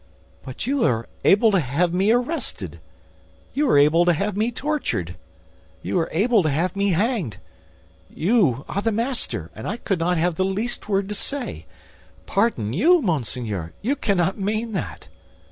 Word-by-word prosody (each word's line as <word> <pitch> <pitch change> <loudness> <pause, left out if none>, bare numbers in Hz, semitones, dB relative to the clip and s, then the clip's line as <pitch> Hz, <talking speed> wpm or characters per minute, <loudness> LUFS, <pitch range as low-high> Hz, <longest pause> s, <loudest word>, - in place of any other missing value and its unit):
"But 130 +6 -6
you 275 0 +1
are 115 -3 +1 0.2
able 215 +3 +5
to 195 - +3
have 165 +5 0
me 190 +3 +2
arrested, 250 +8 -2 0.7
you 290 -1 +1
are - - +5
able 150 +4 +5
to 175 - +4
have 200 +5 -1
me 215 +3 +1
tortured, 250 - -2 0.7
you 185 - 0
are 165 - -1
able 215 +5 +3
to 155 - +1
have 165 +6 0
me 200 -1 +1
hanged; 190 - 0 0.7
you 160 - +1
are 200 - -2
the 225 - +1
master, 225 - -2
and 110 - -7
I 210 - -2
could 195 -6 -2
not 175 +1 +1
have 170 0 0
the 190 - +2
least 210 +4 -3
word 195 -1 +1
to - - -2
say. 275 +5 -4 0.6
Pardon 195 - 0
you, 340 - +5
monseigneur! 120 - -2
You 265 +6 +1
cannot 195 -6 0
mean 215 +3 -1
that!" 100 - -5
195 Hz, 165 wpm, -23 LUFS, 155-225 Hz, 0.7 s, able